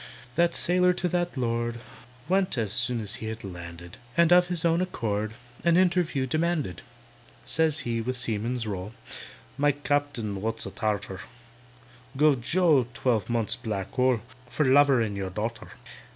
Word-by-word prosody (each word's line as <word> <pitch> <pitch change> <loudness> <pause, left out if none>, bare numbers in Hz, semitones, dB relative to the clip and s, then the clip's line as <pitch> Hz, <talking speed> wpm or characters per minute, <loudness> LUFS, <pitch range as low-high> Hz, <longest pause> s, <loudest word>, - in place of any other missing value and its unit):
That 170 +3 +2
sailor 180 +1 +3
to 180 - -1
that 175 -3 -1
Lord 120 -1 -1 0.5
Went, 190 -1 +1 0.2
soon 120 +1 0
as 105 -1 -2
he 110 - -4
had 110 +1 -5
landed, 85 -2 -9 0.2
And 170 0 +6
of 180 0 +6
his 175 -1 -1
own 165 +1 +3
accord 110 - -2 0.3
An 170 0 +4
interview 175 -7 +2
demanded. 155 - -1 0.6
Says 155 -1 +1
he, 115 -3 -2
with 125 +2 -3
seaman's 115 +1 -2
roll, 100 0 -5 0.7
"My 145 0 +4
Captain 145 -8 -1
(wot's 110 +1 -1
a - - -6
Tartar) 105 -3 -2 1.0
Guv 145 -3 +4
JOE 150 -2 +3
twelve 115 -6 0
months' 115 -2 +1
black 100 -4 -4
hole, 130 -3 +2 0.3
For 150 - 0
lovering 130 -6 +4
your 95 -1 -3
darter. 110 +5 -4
125 Hz, 145 wpm, -27 LUFS, 110-160 Hz, 1.0 s, And